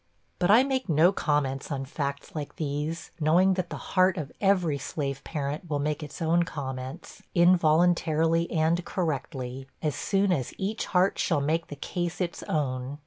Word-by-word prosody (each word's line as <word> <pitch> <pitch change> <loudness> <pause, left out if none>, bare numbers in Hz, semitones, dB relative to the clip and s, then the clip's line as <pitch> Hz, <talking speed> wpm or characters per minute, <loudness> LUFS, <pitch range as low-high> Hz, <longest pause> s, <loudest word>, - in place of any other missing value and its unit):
But 175 0 +2
I 225 +5 +7
make 265 -5 -1
no 160 +4 +5
comments 145 -6 -1
on 135 -1 -2
facts 140 0 -4
like 150 -2 -5
these, 150 +2 -3
knowing 175 +5 +4
that 185 -2 -2
the - - -5 0.2
heart 185 0 +4
of 155 -3 -4
every 180 -7 +2
slave 140 -3 -4
parent 150 +2 -4
will 145 - 0
make 150 +2 -1
its 150 +3 -6
own 165 +2 +3
comments, 130 -5 -6
involuntarily 170 -1 +3
and 165 +2 +2
correctly, 135 -7 -3
as 150 -3 -1
soon 195 -1 +1
as 135 -9 -1
each 205 +4 -2
heart 185 +1 +2
shall 165 -5 +2
make 160 +4 0
the 145 - -7
case 175 +4 -3
its 175 -2 -2
own. 135 -2 -2
160 Hz, 165 wpm, -27 LUFS, 140-175 Hz, 0.2 s, I